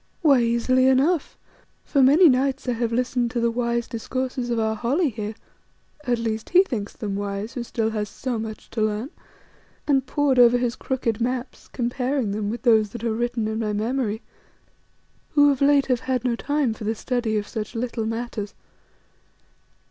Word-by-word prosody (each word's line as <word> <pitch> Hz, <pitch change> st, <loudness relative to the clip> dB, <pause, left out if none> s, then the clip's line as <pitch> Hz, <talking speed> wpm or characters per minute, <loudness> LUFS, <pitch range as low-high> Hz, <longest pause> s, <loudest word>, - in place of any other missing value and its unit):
Why, 280 Hz, -5 st, +5 dB
easily 235 Hz, +2 st, +2 dB
enough. 275 Hz, +5 st, +2 dB, 0.5 s
For 280 Hz, -, +2 dB
many 295 Hz, +7 st, +7 dB
nights 270 Hz, 0 st, +1 dB
I -, -, +2 dB
have 235 Hz, -1 st, -1 dB
listened 245 Hz, 0 st, 0 dB
to 240 Hz, 0 st, -2 dB
the 235 Hz, 0 st, +1 dB
wise 235 Hz, 0 st, -1 dB
discourses 255 Hz, +1 st, -3 dB
of 235 Hz, -, 0 dB
our 220 Hz, -1 st, +1 dB
Holly 275 Hz, -, +1 dB
here, 215 Hz, -2 st, -5 dB, 0.7 s
at 245 Hz, -1 st, +1 dB
least 225 Hz, -1 st, -3 dB
he 365 Hz, +1 st, +6 dB
thinks 225 Hz, -, -4 dB
them 205 Hz, -3 st, -4 dB
wise 200 Hz, +2 st, -4 dB
who 250 Hz, -, -4 dB
still 225 Hz, -1 st, -2 dB
has 210 Hz, -2 st, -3 dB
so 245 Hz, 0 st, -4 dB
much 220 Hz, -1 st, -7 dB
to 225 Hz, -, -2 dB
learn, 215 Hz, +5 st, -1 dB, 0.7 s
and 275 Hz, -3 st, +2 dB
pored 275 Hz, -2 st, +2 dB
over 245 Hz, 0 st, +7 dB
his 245 Hz, -1 st, -1 dB
crooked 240 Hz, -5 st, -2 dB
maps, 250 Hz, +2 st, -3 dB
comparing 250 Hz, -1 st, -1 dB
them 205 Hz, 0 st, -2 dB
with 235 Hz, +3 st, -5 dB
those 220 Hz, -4 st, +4 dB
that 235 Hz, -1 st, -7 dB
are 230 Hz, -2 st, 0 dB
written 240 Hz, -1 st, -1 dB
in 220 Hz, 0 st, -2 dB
my 215 Hz, -2 st, -1 dB
memory, 220 Hz, 0 st, -1 dB, 1.1 s
who 290 Hz, -1 st, +6 dB
of 275 Hz, -, -3 dB
late 280 Hz, 0 st, +4 dB
have 250 Hz, -2 st, +1 dB
had 255 Hz, -1 st, -2 dB
no 240 Hz, -2 st, +1 dB
time 285 Hz, -1 st, 0 dB
for 220 Hz, -, -9 dB
the 220 Hz, +2 st, -1 dB
study 235 Hz, -2 st, -1 dB
of 205 Hz, 0 st, -3 dB
such 220 Hz, +1 st, -5 dB
little 230 Hz, -1 st, -2 dB
matters. 225 Hz, -3 st, -4 dB
240 Hz, 180 wpm, -24 LUFS, 220-260 Hz, 1.1 s, many